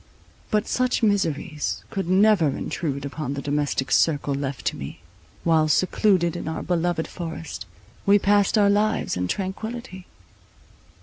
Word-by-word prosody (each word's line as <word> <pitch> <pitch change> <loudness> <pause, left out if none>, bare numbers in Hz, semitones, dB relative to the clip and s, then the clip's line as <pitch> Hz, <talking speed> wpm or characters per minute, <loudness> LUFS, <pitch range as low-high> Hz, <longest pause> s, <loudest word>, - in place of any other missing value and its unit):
But 210 -1 +1
such 255 -1 0
miseries 160 -7 0
could 195 -5 -3
never 190 -3 +5
intrude 140 0 -3
upon 140 -1 -4
the 140 - -4
domestic 145 -2 -1
circle 145 -3 +2
left 135 -1 -4
to - - 0
me, 70 - -7 0.4
while, 160 -2 +3
secluded 180 +2 +2
in - - -5
our 160 0 -3
beloved 175 -1 0
forest, 165 -2 -6 0.4
we 200 +1 +5
passed 205 +1 +3
our 200 -1 +5
lives 215 +2 +1
in 90 0 -1
tranquillity. 195 - -5
170 Hz, 135 wpm, -24 LUFS, 145-205 Hz, 0.4 s, never